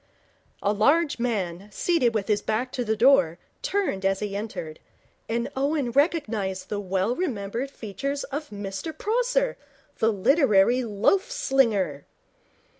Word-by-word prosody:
A 205 - +2
large 285 +8 +3
man, 200 -5 -2
seated 250 - +1
with 200 -3 -1
his 210 -2 +1
back 240 +5 -1
to 250 - -2
the 220 -1 0
door, 215 -9 +4 0.2
turned 400 - -1
as 195 0 +1
he 205 -2 -4
entered, 200 -7 -5 0.5
and 235 +1 -1
Owen 280 -2 0
recognized 230 - 0
the 210 - -2
well 195 +4 0
remembered 240 - -3
features 275 +4 -4
of 290 +2 -5
Mr 205 - -6
Prosser, - - 0 0.4
the 225 0 +3
literary 240 - +3
loaf 230 - +1
slinger. 220 - +1
230 Hz, 130 wpm, -25 LUFS, 200-280 Hz, 0.5 s, door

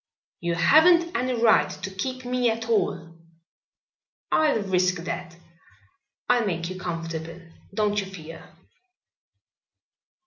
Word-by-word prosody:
"You 170 0 -1
haven't 335 - +5
any 255 0 0
right 230 -1 +4
to 190 +1 -7
keep 255 +6 -4
me 250 -1 +1
at 225 0 -3
all." 165 -7 -1 1.1
"I'll 295 -9 +2
risk 185 -1 +1
that. 170 -1 -6 0.9
I'll 240 - +3
make 170 -3 -2
you 185 - -7
comfortable, 165 -1 -5 0.4
don't 210 -1 +1
you 195 - -4
fear." 165 -4 -11
195 Hz, 110 wpm, -25 LUFS, 170-245 Hz, 1.1 s, haven't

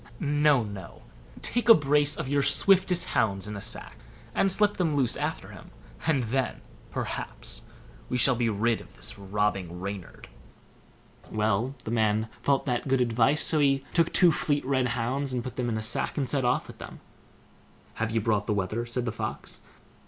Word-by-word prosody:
No, 145 -3 +3
no; 100 -5 -9 0.4
take 240 0 0
a 230 - +11
brace 145 0 +2
of - - -4
your 140 +1 +1
swiftest 185 +2 +3
hounds 100 -2 0
in 105 - -5
a 100 - -6
sack, - - -3 0.4
and 195 +9 +2
slip 205 +2 +2
them 165 -5 0
loose 130 -4 +2
after - - -3
him; - - -12 0.4
and 145 -6 +2
then, 130 +4 -2 0.3
perhaps, - - -4 0.5
we 125 - 0
shall 125 +2 +5
be 120 -1 0
rid 110 +2 0
of - - -17
this - - -1
robbing 95 -3 -2
Reynard." 100 -1 -7 1.0
Well, 110 +4 0
the 110 - -5
man 110 -1 +1
thought 140 -1 +1
that 125 0 -1
good 135 0 +2
advice; 125 +4 +2
so 155 - +2
he 135 -2 +2
took 165 -1 +3
two 180 -2 +6
fleet 145 -2 -1
red 130 -2 +1
hounds, 130 +3 -1
put 125 +1 -6
them 125 -2 -2
into 110 - -1
a 110 - -3
sack, 110 - -2
and 140 -3 0
set 135 -1 0
off 125 +1 +1
with - - -13
them. - - -9 0.9
"Have 110 0 -2
you 115 0 0
brought 105 -2 0
the 105 - +1
wether?" 105 +5 -2
said 120 +1 -2
the 115 - -1
Fox. 110 0 -6
125 Hz, 180 wpm, -27 LUFS, 110-145 Hz, 1.0 s, a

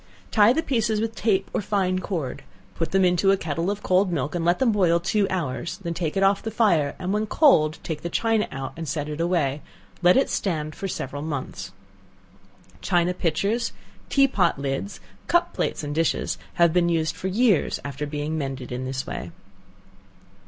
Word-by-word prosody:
Tie 210 0 +6
the 320 +6 +1
pieces 225 -5 0
with 225 +1 -2
tape 200 -4 +1
or - - 0
fine 185 -2 0
cord, 170 -8 -4 0.3
put 165 - -2
them 190 -1 +3
into 180 +2 +3
a 195 - +5
kettle 165 +1 -2
of 205 +1 -3
cold 185 +1 +2
milk, 150 -3 -2
and 175 -2 -1
let 175 +1 +3
them 260 -3 +3
boil 180 -5 +3
two 195 +3 +1
hours, 170 0 -3
then 170 -1 -2
take 165 0 -2
it 195 - +2
off 195 0 +3
the 225 - -4
fire, 175 -10 +2
and 185 +2 -2
when 215 +1 0
cold 160 - +4
take 155 -2 -4
the 170 - -4
china 225 +3 +1
out, 135 -1 -5
and 165 -1 -6
set 145 0 -2
it 150 +1 -4
away; 155 -5 0 0.4
let 180 +4 +6
it 270 - +3
stand 155 -5 -2
for 195 - -5
several 145 -5 -4
months. 130 -11 -5 1.1
China 175 -1 +2
pitchers, 205 +7 -1 0.4
tea 275 -1 +5
pot 205 - +1
lids, 140 +8 -4 0.3
cup 345 0 +2
plates - - -2
and 145 0 -3
dishes, 165 +1 0 0.2
have 170 -2 +4
been 175 -1 +3
used 160 -2 0
for 190 - -4
years 205 -2 +2
after 140 +1 -4
being 150 +1 -3
mended 135 -3 -5
in 125 +1 -3
this 130 0 -3
way. - - -5
175 Hz, 190 wpm, -24 LUFS, 150-200 Hz, 1.1 s, Tie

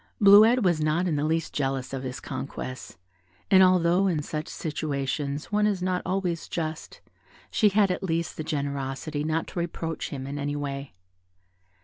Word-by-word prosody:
Bleuette 215 +4 +7
was 175 -4 +2
not 155 +4 +1
in 160 - 0
the 145 - 0
least 160 +1 -1
jealous 135 -2 -2
of 135 - -3
his 130 +1 -5
conquests, 130 -5 -6 0.5
and 190 -1 +8
although 185 0 +4
in 160 -5 0
such 155 +1 -4
situations 145 -1 -3
one 210 0 +3
is 195 -4 -1
not 185 -1 0
always 185 -3 -1
just, 160 -2 -5 0.5
she 215 - +4
had 200 -1 +3
at 180 - -2
least 170 -3 -2
the 155 - -4
generosity 140 0 -3
not 160 +1 0
to - - -6
reproach 165 -1 -3
him 135 -2 -5
in 140 +1 -5
any 145 +1 -2
way. 140 -5 -5
155 Hz, 165 wpm, -26 LUFS, 140-180 Hz, 0.5 s, and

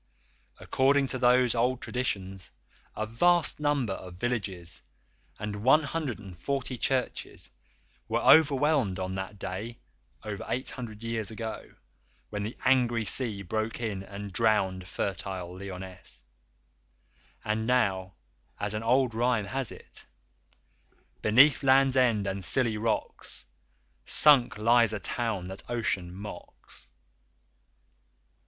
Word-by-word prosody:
According 140 +1 +2
to 130 - -3
those 125 0 +4
old 125 +2 +1
traditions 95 -8 -3 0.5
a 110 - -2
vast 165 +10 +2
number 145 -8 +1
of 90 -2 -9
villages 95 -5 -4 0.6
and 105 0 -4
140 130 - 0
churches 130 0 -2 0.6
were - - 0
overwhelmed 140 - +4
on 95 0 -3
that 95 +2 -5
day, 100 +5 -5 0.5
over 105 -2 -5
eight 130 +2 -2
hundred 115 -4 -8
years 115 -2 -2
ago, 110 0 -7 0.6
when 105 -1 -3
the 105 +3 -5
angry 120 -3 +3
sea 105 -4 -1
broke 110 +5 -3
in 105 -5 -3
and 100 0 -8
drowned 95 -4 +1
fertile 90 -1 -4
Lyonesse, 95 -9 -9 1.2
and 110 +1 -1
now, 95 -7 +1 0.4
as 105 0 -2
an 105 - -2
old 125 +1 +2
rhyme 120 -2 +1
has 130 +4 -3
it: - - -12 1.1
"Beneath 125 +6 +6
Land's 135 0 +4
End 120 -6 +3
and 95 -1 -3
Scilly 115 +3 +1
rocks 110 - -3 0.6
_Sunk 130 -7 +5
lies 115 0 +4
a 105 - -2
town 110 -5 -2
that 95 - -5
Ocean 100 -7 -1
mocks. 100 -9 -10
110 Hz, 115 wpm, -28 LUFS, 100-125 Hz, 1.2 s, Beneath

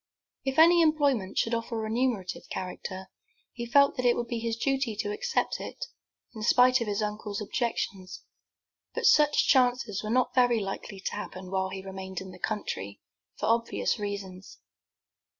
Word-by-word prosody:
If 270 0 -1
any 340 +2 +7
employment 285 - +2
should 230 - +1
offer 230 +1 -2
of - - -2
a - - -4
remunerative 220 -4 -2
character, 185 +1 -6 0.4
he 235 -1 -5
felt 280 +3 +5
that 255 - -1
it 240 - +4
would 240 - -3
be 235 0 -3
his 230 0 -2
duty 270 -2 0
to 220 - -2
accept 470 +3 -1
it, - - -6 0.5
in 220 - -8
spite 250 +3 +5
of 230 - -2
his 205 +1 -1
uncle's 210 -1 -4
objections; 205 -3 -3 0.7
but - - -1
such 295 -1 +5
chances 245 -6 +3
were 215 - -4
not 250 +2 +2
very 245 -3 +4
likely 195 0 -5
to - - -3
happen 185 0 -7
while 190 0 0
he 190 0 -7
remained 190 -1 -6
in 190 0 -9
the 180 - -13
country, 100 - -4 0.4
for - - -2
obvious 230 +1 +1
reasons. 195 -2 -6
225 Hz, 170 wpm, -28 LUFS, 195-255 Hz, 0.7 s, any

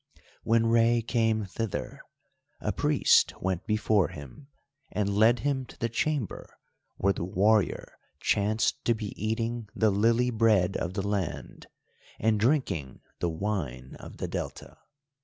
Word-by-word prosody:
When 115 0 +3
Rei 115 0 +3
came 115 -2 +1
thither, 110 +2 -4 0.6
a - - -1
priest - - +3
went 95 -2 -2
before 105 -2 +2
him 75 - -11 0.4
and 105 -2 -1
led 110 +4 +4
him 140 -2 0
to - - -14
the 115 - -1
chamber 135 - -3 0.4
where 100 +1 +2
the - - -4
warrior 100 +3 +1 0.2
chanced 105 +2 +1
to 120 - +3
be 105 -2 -5
eating 115 0 -2
the 110 -2 +3
lily 115 +5 +2
bread 110 -5 +3
of 90 +2 -3
the 100 -1 -2
land, 100 -5 -4 0.5
and 110 0 +2
drinking 105 - 0 0.2
the 85 - 0
wine 80 -9 -4
of - - -11
the - - -3
Delta. - - -6
110 Hz, 140 wpm, -28 LUFS, 95-115 Hz, 0.6 s, led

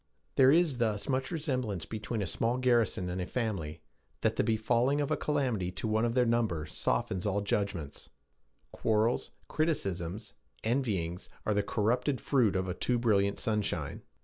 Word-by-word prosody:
There 130 -1 +7
is 155 -4 +3
thus 110 -3 0
much 130 -1 0
resemblance 130 - -2
between 110 +1 -3
a - - -1
small 115 +7 0
garrison 120 -7 +2
and 90 +1 -3
a 90 - -3
family, 85 -10 -3 0.4
that - - +2
the - - +2
befalling 120 +5 +2
of 145 - -1
a - - +4
calamity 125 -11 0
to 110 - -3
one 110 +1 +2
of 115 0 -1
their 125 -1 +4
number 110 -10 +1
softens 85 - -1
all 100 0 +1
judgments; 100 -7 -2 0.6
quarrels, 110 +2 +1 0.2
criticisms, 100 - -2 0.3
envyings, 105 -8 -1 0.2
are 110 - +2
the 105 - +2
corrupted 125 +6 0
fruit 120 -8 +2
of 95 0 0
a 90 - -1
too 120 +6 0
brilliant 100 -4 +2
sunshine. 105 -4 -1
110 Hz, 160 wpm, -31 LUFS, 95-125 Hz, 0.6 s, There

